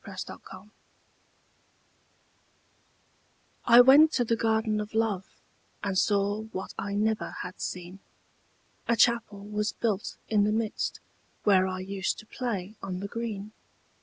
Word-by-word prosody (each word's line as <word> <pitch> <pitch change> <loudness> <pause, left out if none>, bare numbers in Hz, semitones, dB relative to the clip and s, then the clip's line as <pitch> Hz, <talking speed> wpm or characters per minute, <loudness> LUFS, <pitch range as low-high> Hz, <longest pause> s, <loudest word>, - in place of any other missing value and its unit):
THE 195 -3 -10
GARDEN - - -10
OF 190 0 -12
LOVE 210 - -24 2.9
I 240 0 +9
went 285 +5 +7
to 245 - +2
the 230 - +2
Garden 220 -1 +1
of 210 +1 -7
Love, 215 -4 0 0.6
And 200 -2 -1
saw 205 +1 +2
what 190 -3 -6
I 200 0 -3
never 215 +1 0
had 180 0 -8
seen; 180 +1 -5 0.9
A 235 - +3
Chapel 230 -3 +2
was 210 +1 -2
built 210 -4 -2
in 210 -2 +3
the 210 - +2
midst, 220 0 -2 0.4
Where 190 -2 +4
I 185 0 -4
used 190 0 -2
to - - -11
play 215 -5 -4
on 185 -2 -4
the 200 - -4
green. 215 -2 -5
210 Hz, 140 wpm, -28 LUFS, 195-225 Hz, 2.9 s, I